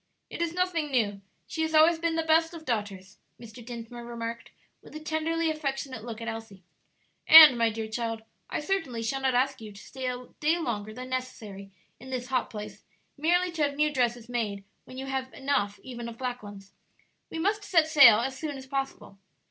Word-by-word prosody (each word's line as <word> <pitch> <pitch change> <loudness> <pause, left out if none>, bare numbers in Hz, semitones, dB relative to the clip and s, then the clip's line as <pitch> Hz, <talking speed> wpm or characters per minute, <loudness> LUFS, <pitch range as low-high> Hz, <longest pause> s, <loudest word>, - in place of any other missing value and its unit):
"It - - -5
is 340 0 -1
nothing 355 -4 0
new; 210 -7 0 0.2
she 320 - -4
has 320 0 0
always 320 +2 +6
been 335 0 0
the 325 - 0
best 325 +1 +2
of 320 -1 -10
daughters," 205 -5 -4 0.2
Mr. 235 0 -11
Dinsmore 235 0 -8
remarked, 235 -1 -6 0.3
with - - -15
a - - -5
tenderly 320 +1 -1
affectionate 270 -6 -4
look 230 -1 -7
at 230 - -6
Elsie. 225 -4 -7 0.6
"And, 310 -4 +11
my 230 -1 +2
dear 220 0 -4
child, 225 0 -3 0.3
I - - -2
certainly 295 -10 -2
shall 270 +4 -2
not 260 -2 +1
ask 260 0 +1
you 215 -1 -8
to 200 - -13
stay 260 +4 -6
a 250 0 -5
day 310 +3 +2
longer 215 -9 -3
than 255 +3 -8
necessary 215 -6 -6 0.3
in 255 +3 -11
this 250 -1 -4
hot 255 -2 0
place, 210 -1 -8 0.3
merely 350 +4 +2
to 330 -2 -4
have 285 -1 +1
new 300 +1 +1
dresses 240 -3 0
made 215 -5 -3 0.2
when 255 - -11
you 265 - -5
have 265 -1 -3
enough 265 -7 -1
even 240 -2 -7
of 230 - -10
black 250 -1 -4
ones. 200 -1 -12 0.6
We - - -6
must 410 +5 0
set 330 -6 +3
sail 260 -8 +8
as 265 +2 -3
soon 290 0 -5
as 265 - -10
possible. 270 -7 -5
255 Hz, 200 wpm, -28 LUFS, 225-310 Hz, 0.6 s, And